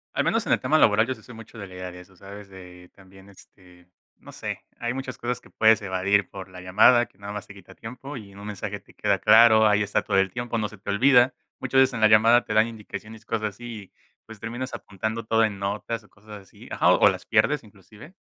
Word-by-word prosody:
Al - - +1
menos - - 0
en - - +2
el - - 0
tema 155 - +2
laboral, 110 +1 +4
yo 130 - -3
sí 110 - -16
soy 120 - -13
mucho 115 +1 -13
de 100 -2 -8
la 95 - -14
idea 90 0 -7
de 90 - -12
eso, 90 +1 -17
¿sabes? 100 +2 -12
De 90 -2 -14
también, 95 0 -18
este, 90 -2 -20 0.3
no - - -15
sé, - - -6 0.2
hay 120 +1 -2
muchas 130 -1 -6
cosas 125 +1 -4
que - - -19
puedes 110 0 +3
evadir 95 0 0
por 95 -1 -9
la 90 -1 -12
llamada 110 +7 +4
que 95 - -29
nada 100 +1 -8
más 105 -2 -7
te 100 - -12
quita 100 -3 -16
tiempo 125 +5 -9
y 105 -5 -10
en 100 - -14
un 100 - -9
mensaje 105 -2 -5
te - - -22
queda - - 0
claro, 110 0 +6
ahí 105 0 +3
está 100 - -1
todo - - 0
el 95 -1 +2
tiempo, 120 0 -4
no 105 -1 -2
se 105 - -14
te 100 - -10
olvida. 125 +4 +4 0.3
Muchas 135 0 +2
veces 130 - +3
en - - -4
la 110 - +6
llamada 115 +3 +5
te - - -4
dan 110 +1 +4
indicaciones, 110 0 -10
cosas 110 -1 -2
así 110 -1 -10 0.3
pues 110 -1 -13
terminas 120 +4 -6
apuntando 110 +3 -5
todo 110 +1 +2
en 100 -3 -1
notas 105 +3 -4
o 105 - -23
cosas 105 +2 -19
así 95 - -17
ajá - - +3
o - - +5
las - - -5
pierdes 150 -3 +2
inclusive 105 - -16
105 Hz, 250 wpm, -24 LUFS, 100-115 Hz, 0.3 s, claro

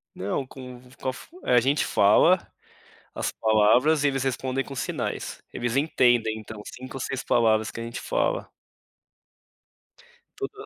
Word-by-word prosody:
Não 100 +8 -2
com 125 -1 -10
v 125 0 -19
com 130 - -3
a - - -3
fu 355 - -14
a 125 - +4
gente 140 +5 +1
fala, 105 - +5 0.8
as - - -2
palavras 115 +8 +3
e - - +6
eles 135 -1 0
respondem 130 0 -1
com 135 - -9
sinais, - - -4
eles 120 0 -2
entendem 120 -6 +2
então 110 0 -9
5 130 +1 -9
ou 130 - -4
6 135 -1 -3
palavras 110 -2 +2
que 115 - -7
a - - -4
gente 115 +1 -6
fala. - - -1 1.9
Tudo 420 +1 -6
125 Hz, 160 wpm, -25 LUFS, 115-140 Hz, 1.9 s, e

